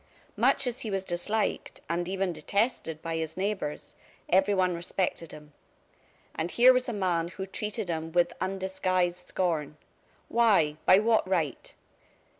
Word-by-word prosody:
Much 275 - +3
as 245 -1 -2
he 220 - -4
was 195 -1 -1
disliked, 195 +4 -2
and 175 +1 -1
even 190 -1 -1
detested, 200 -5 -1
by 165 0 -3
his 160 0 -4
neighbors, 195 -6 -3 0.3
everyone 190 -1 +3
respected 170 -1 -2
him. 150 -1 -13 0.8
And 160 +2 -3
here 250 +5 +6
was 250 0 0
a - - -1
man 180 -6 0
who 190 +2 -6
treated 210 +1 -4
him 160 -1 -3
with 175 0 +2
undisguised 185 -2 -1
scorn. 160 -5 -1 0.5
Why? 200 -11 +3
By 185 - +8
what 220 -1 +2
right? 160 -8 -2
185 Hz, 140 wpm, -28 LUFS, 170-205 Hz, 0.8 s, By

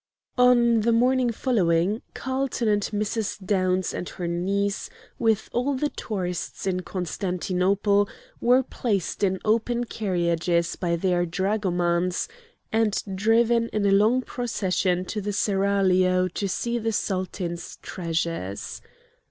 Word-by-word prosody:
On 240 -2 +5
the 225 +2 +2
morning 250 +1 +3
following, 200 -4 +1
Carlton 260 -2 -1
and 205 -1 +3
Mrs. 210 0 -2
Downs 185 -2 +1
and 175 - -4
her 175 - -5
niece, 195 +4 -1 0.3
with 225 -3 +2
all 265 +4 +1
the 295 +3 0
tourists 180 -9 -4
in 185 -1 0
Constantinople, 185 +2 0 0.3
were 250 +2 +4
placed 210 -7 -2
in 190 -1 +2
open 230 +2 +1
carriages 170 -5 0
by 170 -2 -1
their 175 0 +1
dragomans, 180 -2 0 0.4
and 220 -2 +1
driven 230 +3 +3
in 210 -1 -1
a 200 - +4
long 220 +6 +4
procession 190 -7 -1
to 210 +3 -3
the 205 +1 -3
Seraglio 190 -2 +2
to 195 +3 -3
see 235 +5 -1
the 225 0 -1
Sultan's 185 -3 -3
treasures. 165 - -3
200 Hz, 120 wpm, -25 LUFS, 180-225 Hz, 0.4 s, On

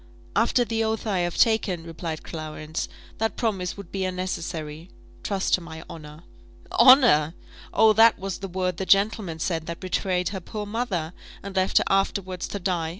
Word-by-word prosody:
"After 235 +3 +3
the 225 0 -1
oath 220 +1 -2
I 200 -4 0
have 175 -1 -1
taken," 210 -7 +2
replied 165 -1 -6
Clarence, 155 -1 -5 0.3
"that 225 -1 0
promise 195 -6 -1
would 200 -3 -10
be 195 -1 -2
unnecessary. 170 -3 -4 0.3
Trust 195 -2 -1
to 185 - +4
my 160 -1 -9
honour." 150 0 -11 0.5
"Honour! 230 - +6 0.4
Oh, 220 -1 +5
that 225 +1 +6
was 195 0 -5
the 195 - -5
word 180 -1 -2
the 190 - -3
gentleman 200 -4 +2
said 160 0 -2
that 170 0 -5
betrayed 185 -1 -1
her 195 - -5
poor 210 +4 -6
mother, 205 -7 -2 0.3
and 200 0 -7
left 190 0 +2
her - - +5
afterwards 195 -2 0
to - - -4
die. 175 -4 -1
185 Hz, 170 wpm, -25 LUFS, 165-205 Hz, 0.5 s, Honour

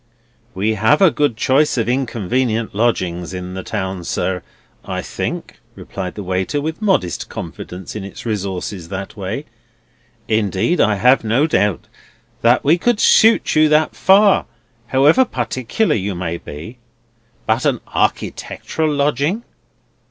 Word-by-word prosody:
"We 105 +4 +1
have 110 +8 +3
a 190 -4 +6
good 145 -7 0
choice 135 +4 +2
of 115 - 0
inconvenient 120 -2 -1
lodgings 95 -5 -1
in 90 0 -6
the 95 - -5
town, 95 -1 -4
sir, 90 +1 -2 0.4
I - - -4
think," - - -5 0.2
replied 90 -1 -6
the 105 - -6
waiter, 95 +9 -1
with 160 +6 -4
modest 190 - 0
confidence 90 +3 -8
in 105 - -5
its 100 - -9
resources 95 -4 -4
that 95 +2 -6
way; 105 +8 -4 0.8
"indeed, 110 - +1
I 105 - +3
have 125 +6 +4
no 115 +7 +2
doubt 105 - 0 0.6
that 120 +2 +4
we 160 +5 +3
could 240 +2 +1
suit 225 +1 +5
you 155 0 +5
that 155 +1 +2
far, 200 +1 +4 0.4
however 140 - +5
particular 130 - -1
you 100 -2 -2
might 85 -1 -4
be. 85 +13 -9 0.7
But - - +1
a - - +1
architectural 160 -1 -1
lodging!" 145 - 0
115 Hz, 135 wpm, -18 LUFS, 95-150 Hz, 0.8 s, a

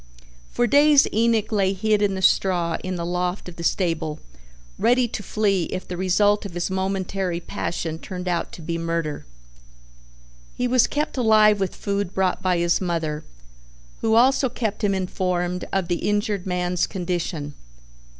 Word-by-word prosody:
For 240 - +1
days 290 +4 +6
Enoch 225 -1 +2
lay 195 -2 +2
hid 210 +2 +1
in 200 -2 +1
the 190 - -4
straw 175 -3 +2
in 185 0 -3
the 170 -1 -3
loft 180 +2 -2
of 180 - -9
the 170 - -6
stable 165 -4 0 0.6
ready 245 0 +3
to 215 - -5
flee 200 -3 0
if 185 - -5
the 180 - -5
result 205 +3 +2
of 195 -4 -8
his 175 +2 -2
momentary 190 -1 -2
passion 165 -1 -4
turned 180 +1 -7
out 175 -1 -1
to 165 - -9
be 165 +1 -3
murder. 165 - -3 1.3
He 250 - 0
was 250 -1 +4
kept 295 -1 -2
alive 215 -3 +5
with 195 -2 -2
food 200 -2 -3
brought 190 -1 +1
by 185 -2 +1
his 170 +1 +1
mother, 165 -4 -2 0.8
who 220 0 +2
also 260 +2 +4
kept 220 -2 -3
him 200 -1 +2
informed 180 -1 -2
of 190 -3 0
the 175 -1 0
injured 205 -1 -1
man's 180 -1 0
condition. 175 -5 -3
190 Hz, 160 wpm, -23 LUFS, 175-210 Hz, 1.3 s, days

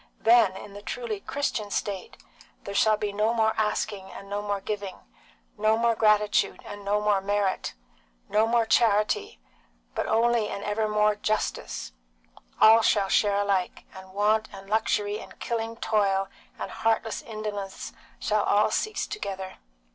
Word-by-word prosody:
Then, 225 -5 +5
in 205 - -10
the 205 - -9
truly 230 -1 -4
Christian 220 -5 -2
state, 200 -1 -4 0.5
there 200 - -6
shall 215 +1 +4
be 210 -1 -3
no 215 +3 +1
more 220 -1 +3
asking 210 -2 -1
and 195 - -10
no 205 +1 -3
more 205 -1 -2
giving, 200 -1 -5 0.6
no 215 +1 +3
more 235 0 +3
gratitude 210 -1 +2
and 205 0 -8
no 205 +1 +1
more 210 -2 +2
merit, 200 -1 -1 0.5
no 215 +1 +2
more 230 0 +2
charity, 215 - +2 0.5
but - - -2
only 230 -1 +2
and 200 - -5
evermore 210 0 +1
justice; 210 - -2 0.7
all 225 +1 +8
shall 200 -3 +2
share 205 0 +3
alike, 195 -3 -1
and 190 0 -12
want 215 +2 +2
and 195 -1 -11
luxury 210 -1 +1
and - - -12
killing 230 -1 -3
toil 195 -4 +1 0.3
and - - -5
heartless 225 0 0
indolence 210 -3 -6 0.3
shall - - +1
all - - +3
cease 435 0 -1
together. 190 - -6
210 Hz, 145 wpm, -26 LUFS, 200-220 Hz, 0.7 s, all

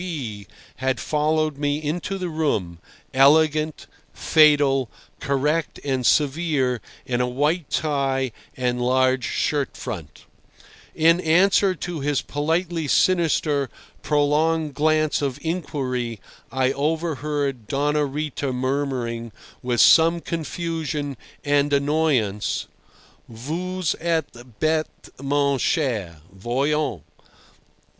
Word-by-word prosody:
K. - - -5
B. 120 - -5 0.3
had 130 -2 -1
followed 155 +1 0
me 145 0 0
into 165 +6 -3
the 185 -1 -3
room, 110 - -1 0.3
elegant, 155 +3 +3 0.3
fatal, 145 -5 +4 0.3
correct 150 +4 -1
and 130 -2 0
severe 145 -4 +1 0.2
in 125 -1 -1
a 125 - +1
white 150 +6 0
tie 135 -4 0 0.3
and 125 -1 -1
large 130 0 +2
shirt 145 -2 -1
front. 100 - -7 0.7
In 165 +2 +4
answer 185 +3 +3
to 175 -3 -5
his 145 -1 0
politely 160 +2 -1
sinister, 155 -6 +2 0.3
prolonged 150 +1 +1
glance 155 0 +1
of 140 -2 -2
inquiry, 130 - -3 0.3
I 130 0 +1
overheard 145 -4 -2
Doña 145 0 0
Rita 145 -2 -3
murmuring, 125 -3 -2 0.3
with 125 -2 +1
some 165 +1 +6
confusion 160 -3 -3 0.3
and 145 0 +2
annoyance, 140 -8 +1 0.6
"Vous 170 +11 -5 0.2
êtes 160 -7 -2 0.2
bête 155 -3 -2
mon 140 -1 +1
cher. 105 - -1
Voyons! 125 - -1
145 Hz, 100 wpm, -23 LUFS, 130-160 Hz, 0.7 s, some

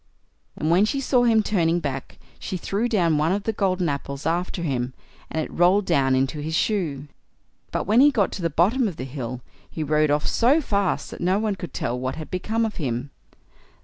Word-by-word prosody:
And 155 - -1
when 180 +4 +5
she 275 +5 -1
saw 250 -2 +2
him 225 -2 +4
turning 175 -5 +1
back, 135 -4 -5 0.2
she 185 - -4
threw 205 +7 -1
down 170 -9 +2
one 155 +3 +2
of 200 +1 -1
the 225 - -1
golden 185 -3 0
apples 140 -1 -4
after 175 +1 -1
him, 130 -4 -2 0.3
and 160 - -3
it - - -11
rolled 185 +4 +4
down 135 -6 +2
into 135 +3 0
his 160 +2 -3
shoe. 160 -9 -1 0.6
But - - -1
when 220 +6 +4
he 290 - +7
got 220 -9 +1
to - - -5
the 165 - 0
bottom 210 - +2
of 185 - -5
the - - -5
hill 125 -2 -5 0.3
he 160 - -4
rode 150 0 +2
off 145 +1 +1
so 260 +7 +3
fast 200 - -1
that - - -9
no 185 +3 +2
one 215 -1 0
could 175 -6 -7
tell 120 +1 -2
what 130 +1 -3
had 155 - -8
become 220 +5 0
of 215 - -4
him. 130 -2 -3
175 Hz, 215 wpm, -24 LUFS, 145-205 Hz, 0.6 s, he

